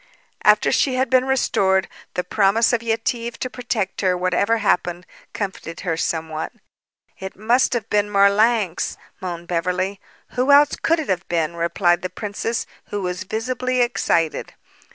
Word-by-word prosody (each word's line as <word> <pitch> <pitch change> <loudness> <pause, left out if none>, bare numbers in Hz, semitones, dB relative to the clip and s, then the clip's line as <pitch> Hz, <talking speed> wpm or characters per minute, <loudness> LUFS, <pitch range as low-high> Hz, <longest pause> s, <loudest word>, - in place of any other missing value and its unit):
After - - +5
she 265 -2 +2
had 255 -1 0
been 255 0 +4
restored, 195 -8 +2 0.3
the 180 - 0
promise 205 +5 +2
of 235 - +1
Yetive 230 +1 -2
to 255 - -4
protect 235 -6 -3
her, 185 -2 +2
whatever 185 +5 +1
happened, 180 -4 0 0.3
comforted 190 -5 -5
her 180 -3 -1
somewhat. 160 -1 -3 0.7
"It 190 0 -7
must 235 +7 +2
have 235 -4 -2
been 205 0 +1
Marlanx," 200 -1 +2 0.2
moaned 175 -2 -6
Beverly. 180 +3 -1 0.3
"Who 255 +3 +1
else 290 +1 +6
could 330 - +1
it 315 - -4
have 185 0 -1
been?" 170 -1 -1
replied 175 +1 +1
the 185 - -3
princess, 210 +4 -3 0.2
who 205 -1 -3
was 180 +2 -3
visibly 250 +4 -1
excited. 165 -9 0
200 Hz, 150 wpm, -21 LUFS, 180-235 Hz, 0.7 s, else